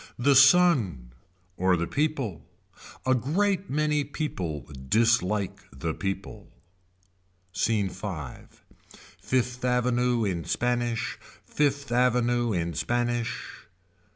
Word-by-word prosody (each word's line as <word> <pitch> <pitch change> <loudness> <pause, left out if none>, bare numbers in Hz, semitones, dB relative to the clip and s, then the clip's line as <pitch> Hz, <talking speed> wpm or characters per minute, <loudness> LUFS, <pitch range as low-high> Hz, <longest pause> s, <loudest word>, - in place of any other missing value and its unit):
The 140 +4 +3
sun. 135 - +5 0.5
Or 90 0 +3
the 85 - -1
people. 140 - -2 0.6
A 130 - +4
great 190 - 0
many 150 +1 +1
people 90 - -4 0.2
dislike 105 -3 +2
the 80 +5 -4
people. 100 +2 -5 1.0
Scene 100 +2 +1
V. 95 0 -5 1.0
Fifth 125 -1 -1
Avenue 125 -1 +1
in 90 -4 -2
Spanish. 120 -2 -1 0.3
Fifth 140 -2 0
Avenue 120 -1 +2
in 85 -3 -1
Spanish. 120 +6 -2
120 Hz, 95 wpm, -27 LUFS, 95-135 Hz, 1.0 s, sun